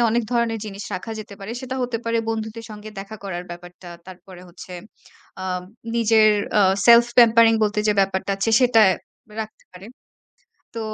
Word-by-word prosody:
অনেক 235 +2 +1
ধরনের 235 -2 0
জিনিস 200 -1 -7
রাখা 185 +5 -6
যেতে 205 -1 -9
পারে। 195 - -7
সেটা 260 0 -5
হতে 245 -2 -2
পারে 230 0 0
বন্ধুদের 225 0 -4
সঙ্গে 215 0 -9
দেখা 200 +3 -8
করার 180 -2 -5
ব্যাপারটা। 175 +1 -11 0.2
তারপরে 185 0 -13
হচ্ছে, 180 +1 -12 0.7
আম 180 -1 -3 0.3
নিজের 220 -1 +4 0.3
অ - - +5 0.3
self 235 0 +8
pampering 230 -1 +6
বলতে 210 0 -1
যে 210 - +4
ব্যাপারটা 195 0 -1
আছে, 195 +3 -1
সেটায় 225 -6 +5 0.5
রাখতে 215 0 -9
পারে। 185 +2 -12 0.9
তো 230 - -4
215 Hz, 160 wpm, -22 LUFS, 190-230 Hz, 0.9 s, self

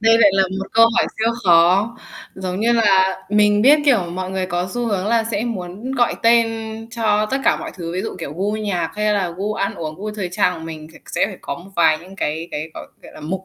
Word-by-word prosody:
Đây 225 +1 +5
lại 205 -3 +6
là 195 - +4 0.2
một 195 - -4
câu 230 0 +7
hỏi - - +3
siêu 225 +1 +1
khó. 185 +7 +4 0.4
Giống 185 +1 -4
như 235 +2 +3
là 195 -5 +3
mình 210 0 +3
biết, 290 +4 +7
kiểu, 275 -6 +5
mọi 185 +1 -4
người 190 -1 -2
có 175 +1 -2
xu 245 -1 -1
hướng 200 -3 -1
là 225 0 +2
sẽ 210 +2 -1
muốn 210 +2 -5
gọi 245 -3 +1
tên 230 0 +5 0.4
cho 215 -2 +1
tất 270 - +1
cả - - +4
mọi - - -6
thứ, 170 -2 -6
ví 185 +2 -2
dụ, - - -5
kiểu, 155 -4 -6
gu 200 +3 -1
nhạc 200 -6 -2
hay 210 0 +1
là 190 -4 0
gu 210 +2 -2
ăn 200 - -2
uống, 155 -2 -5
gu 210 +4 -5
thời 205 -4 -4
trang 180 0 +2
của 160 - -9
mình 155 -1 -8
thì - - -15
sẽ - - 0
phải 195 -3 -8
có - - -5
một 175 +6 -13
vài 155 -2 +4
những 185 +4 -14
cái 160 0 -3
cái, 155 +2 -5
gọi - - -8 0.2
gọi - - -13
là, - - -11
mục. 185 +5 -4
195 Hz, 255 wpm, -20 LUFS, 180-220 Hz, 0.4 s, câu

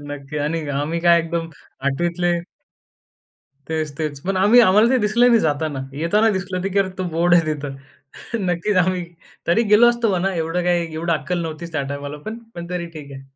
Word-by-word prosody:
नक्की 145 0 -7
आणि 150 +1 -2
आम्ही 150 +4 -2
काय 170 0 +5
एकदम 165 0 -3 0.4
8वी 155 +6 +1
तले 175 0 +2 1.4
तेच, 155 -2 -2
तेच. 150 -3 -3
पण 195 -1 0
आम्ही 210 +6 +6
आम्हाला 210 +2 +5
ते 260 - +3
दिसलं 230 +3 +3
नाही 230 -2 +5
जाताना. 150 -2 -1
येताना 170 +10 +2
दिसलं 185 -1 -3
की 195 +1 -1
"अरे 195 - +2
तो 185 - -1
बोर्ड 175 +1 +3
आहे 170 - +5
तिथं." 140 -2 -6 0.7
नक्कीच 180 +4 0
आम्ही 185 -1 -1 0.4
तरी 175 +8 +3
गेलो 240 +3 +7
असतो 235 -2 0
म्हणा. 190 +1 0
एवढं 165 +2 -1
काही 175 -2 0
एवढी 165 +2 -2
अक्कल 175 +2 -2
नव्हतीच 165 +1 -6
त्या 155 - -1
टाईमाला 145 +1 -6 0.4
पण 170 0 -7
तरी 180 -1 -3
ठीक 140 -2 -10
आहे. 135 0 -9
170 Hz, 185 wpm, -21 LUFS, 155-185 Hz, 1.4 s, गेलो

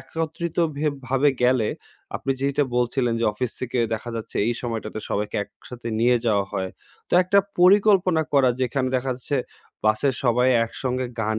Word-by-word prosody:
একত্রিত 165 +1 -4 0.2
ভে 155 +1 -1 0.2
ভাবে 135 +2 +3
গেলে, 125 -3 +3 0.5
আপনি 135 - -4
যেইটা 140 +1 +1
বলছিলেন 120 -1 +1
যে - - +1
অফিস 120 +3 -3
থেকে 125 -1 -2 0.2
দেখা 120 +2 -6
যাচ্ছে 110 - -7
এই 120 - +1
সময়টাতে 110 -2 -4
সবাইকে 105 0 -2
একসাথে 120 +2 -10
নিয়ে 120 +1 +4
যাওয়া 100 -3 +2
হয়। 95 -2 -2 0.4
তো - - -17
একটা 190 +2 +3 0.2
পরিকল্পনা 185 -3 +5
করা, 135 -3 +5
যেখানে 130 +1 0
দেখা 130 +1 -2
যাচ্ছে 135 +3 -3 0.5
বাসের 110 +5 +2
সবাই 125 +1 +3 0.2
একসঙ্গে 130 +2 -3
গান 110 0 0
125 Hz, 160 wpm, -23 LUFS, 115-140 Hz, 0.5 s, পরিকল্পনা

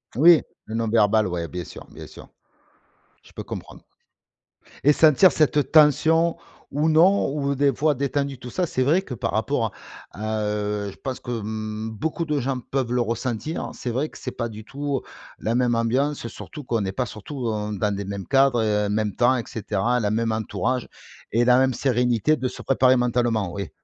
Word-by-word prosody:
Oui, 165 +4 +7 0.2
le 110 - -6
non 115 0 -1
verbal, 110 -1 +3
ouais, 85 -2 -3
bien 90 +1 -5
sûr, - - -11
bien - - -10
sûr, - - -13 0.9
je - - -20
peux - - -6
comprendre. - - -8 1.0
Et 145 +1 +6
sentir 160 +4 +6
cette 150 0 +1
tension 160 +2 +4 0.3
ou 150 +3 +1
non 175 +5 +4
ou 140 -1 -1
des 140 0 +2
fois, 150 +2 +1
détendu, 140 0 -2
tout 125 - -8
ça, 180 +7 -1
c'est 130 -5 -1
vrai 160 +8 +3
que 145 - -8
par 115 -1 -3
rapport 115 +1 0
à - - -10 0.4
à, 110 +1 -3
heu, 105 -1 -2
je - - -16
pense 130 -1 -5
que, 125 - -6
mmh, 110 0 -4
beaucoup 160 +9 -3
de 150 -2 0
gens 130 0 -2
peuvent 130 0 -3
le 125 - +1
ressentir. 120 +6 -3
C'est 125 - -5
vrai 135 +6 -1
que - - -13
c'est 125 - -5
pas 115 -1 -3
du 110 0 -10
tout 140 0 -3 0.4
la 115 +2 -1
même 120 -1 +2
ambiance 125 +4 0
surtout 150 +5 -9
qu'on 115 -4 0
est 95 - -2
pas 125 +6 -2
surtout 120 +4 -7 0.3
dans 105 0 -1
des 100 - -4
mêmes 100 -1 -6
cadres, 135 -3 +3
heu, 105 -1 +1
même 105 -1 -1
temps 125 +2 +3
et 115 - -3
cetera, 110 +3 -1
la 105 -1 0
même 115 +1 0
entourage 115 +3 -2 0.4
et 120 +3 +2
la 125 0 +5
même 130 0 +3
sérénité 125 +2 +1
de 130 -4 -2
se - - -8
préparer 130 -1 +3
mentalement, 120 -6 0
oui. 100 -4 -5
125 Hz, 195 wpm, -23 LUFS, 110-140 Hz, 1.0 s, Oui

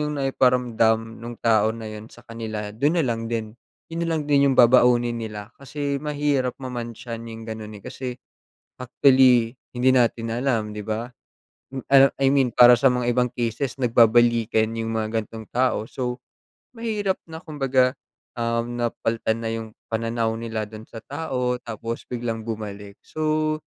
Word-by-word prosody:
'yong 150 0 -2
naiparamdam 120 -4 +1
nung 120 0 -7
tao 110 -1 +2
na 115 - -8
yon 110 +1 -8
sa 120 - -17
kanila 110 -3 -6
don 145 +10 +1
na 165 - +2
lang 115 -2 -2
din. 110 -2 -3 0.4
Yon 165 - -3
na 165 -1 0
lang 150 - -2
din 140 -1 +4
yong 135 - +1
babaunin 120 -1 +5
nila 105 0 -7
kasi 140 0 -3
mahirap 145 -4 -1
mamantsahan 120 -2 -6
yong 115 0 -8
ganon 110 -1 -7
eh. 100 - -16
Kasi 125 -1 -6 0.6
actually 125 -1 +4 0.2
hindi 125 +1 +3
natin 115 -2 +2
alam 115 -3 0
'di 105 0 -7
ba? 115 +3 -3 0.8
Ano, 135 0 +6
I 135 - +5
mean 135 -3 +2
para 120 0 +8
sa 135 - +2
mga 120 -1 0
ibang 125 0 +1
cases 120 +2 -2
nagbabalikan 115 -2 +3
yung 115 0 -2
mga 110 0 -1
gan'tong 110 0 -7
tao. 125 -3 +2
So, 125 -1 -3 0.6
mahirap 215 -4 -1 0.2
na 160 - -6
kumbaga, 135 -5 +1 0.4
um, 115 0 -2
napalitan 115 -1 -1
na 115 - -4
yung 110 -1 -6 0.2
pananaw 115 0 -1
nila 110 -2 -4
dun 110 0 -10
sa 115 - -10
tao 125 0 -2
tapos 115 +1 -5
biglang 115 -2 -3
bumalik. 105 -2 -7
So, 155 0 -1
120 Hz, 155 wpm, -23 LUFS, 115-130 Hz, 0.8 s, para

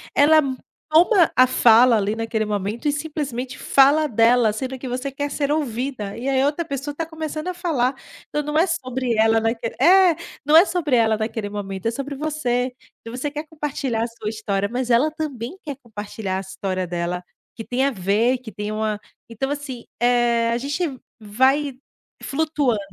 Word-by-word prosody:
ela 310 +2 +6 0.5
toma 345 +3 +5
a 255 - +7
fala 240 -1 +6
ali 205 +1 0
naquele 225 -1 -2
momento 210 +6 -3
e - - +3
simplesmente 285 -5 -4
fala 285 +3 +4
dela 230 -2 +3
sendo 260 +3 -5
que 260 - -6
você 255 +3 -3
quer 285 +2 -3
ser 285 0 -1
ouvida 255 -7 -2
e 255 +4 -3
aí 265 -1 +2
outra 290 +4 0
pessoa 280 -1 -5
está 325 +3 -3
começando 315 0 -5
a - - -3
falar. 305 -8 0 0.4
Então 295 - -1
não 300 +1 -2
é 330 - +5
sobre 255 -7 -2
ela 225 +1 +4
naquele 225 0 -2
é, 370 -1 +6 0.3
não 300 +2 +4
é 330 - +10
sobre 335 -7 0
ela 220 -2 +3
naquele 220 -1 -3
momento, 200 0 -5
é - - +1
sobre 275 +4 -5
você. 265 -4 -1 0.3
Então 230 - -9
você 290 +3 -2
quer 300 +1 -5
compartilhar 275 -7 -2
a - - -1
sua 230 -2 -6
história 205 -2 -2
mas 250 0 -2
ela 250 +6 +3
também 295 - -5
quer 290 -3 -5
compartilhar 205 -3 -5
a - - -2
história 190 -1 -4
dela, 175 +1 -3 0.3
que 225 - -7
tem 250 +2 0
a 280 - +2
ver, 215 +5 +1
que 240 -3 -11
tem 210 +2 -5
uma 215 -1 -2 0.3
então 235 +4 -3
assim, 280 -4 -5
eh, 240 -1 +2
a 235 - +1
gente 285 +7 -3 0.4
vai 260 +6 +1 0.5
flutuando, 290 -6 0
250 Hz, 185 wpm, -22 LUFS, 225-290 Hz, 0.5 s, é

